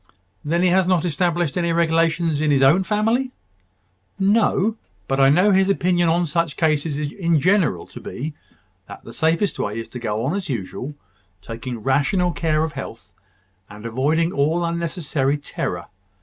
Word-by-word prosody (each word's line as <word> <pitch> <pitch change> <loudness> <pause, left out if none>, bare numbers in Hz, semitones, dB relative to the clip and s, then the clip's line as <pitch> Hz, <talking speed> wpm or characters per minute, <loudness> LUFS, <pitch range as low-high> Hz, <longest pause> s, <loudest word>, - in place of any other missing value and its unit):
"Then 170 +4 0
he 185 - +4
has 185 0 +3
not 180 -2 +2
established 175 -1 0
any 170 -1 0
regulations 165 -1 +1
in 155 - +1
his 140 -2 +3
own 150 +8 +5
family?" 225 +6 0 0.9
"No. 205 +1 +2 0.3
But 135 0 0
I 135 0 +6
know 180 +8 +4
his 190 0 +3
opinion 175 -3 +2
on 170 +2 +2
such 165 0 -1
cases 155 -2 +1
in 160 +2 0
general 170 - +2
to - - -11
be, 150 +4 -6 0.5
that - - -11
the - - -11
safest 165 +3 0
way 105 +2 -2
is 115 - -5
to 125 - -7
go 110 0 -2
on 145 - 0
as 195 -4 -4
usual, 125 +5 -5 0.4
taking 115 +2 -7
rational 160 - +1
care 155 -2 0
of 160 - -2
health, 125 -4 -8 0.6
and 105 +2 -11
avoiding 150 +8 +1
all 160 +4 +1
unnecessary 165 -4 -1
terror. 145 - -4
165 Hz, 165 wpm, -21 LUFS, 140-180 Hz, 0.9 s, I